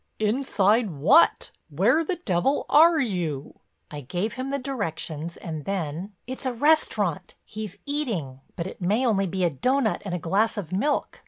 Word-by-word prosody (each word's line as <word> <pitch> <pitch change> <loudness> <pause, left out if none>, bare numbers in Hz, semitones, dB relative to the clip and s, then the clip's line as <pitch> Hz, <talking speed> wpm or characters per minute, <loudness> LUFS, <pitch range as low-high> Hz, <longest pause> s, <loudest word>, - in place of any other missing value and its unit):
"Inside 215 -1 +2
what, 165 - +4 0.2
where 210 - +3
the 355 +3 -2
devil 265 - 0
are 325 +3 +6
you?" 175 - -3 0.3
I 150 -1 -6
gave 175 - -3
him 260 +1 -4
the 280 - -1
directions 170 - -4
and 155 -3 -6
then: 185 +1 -4
"It's 260 +2 -5
a 255 - -1
restaurant; 220 - +1
he's 210 -3 -7
eating. 215 - -3
But 170 - -3
it 190 - -8
may 210 +8 +1
only 195 -5 +2
be 185 +1 -2
a 175 - +2
doughnut 245 - 0
and 195 -3 -3
a - - -1
glass 195 +8 0
of 185 -5 -5
milk. 245 +11 -1
205 Hz, 165 wpm, -25 LUFS, 170-260 Hz, 0.3 s, are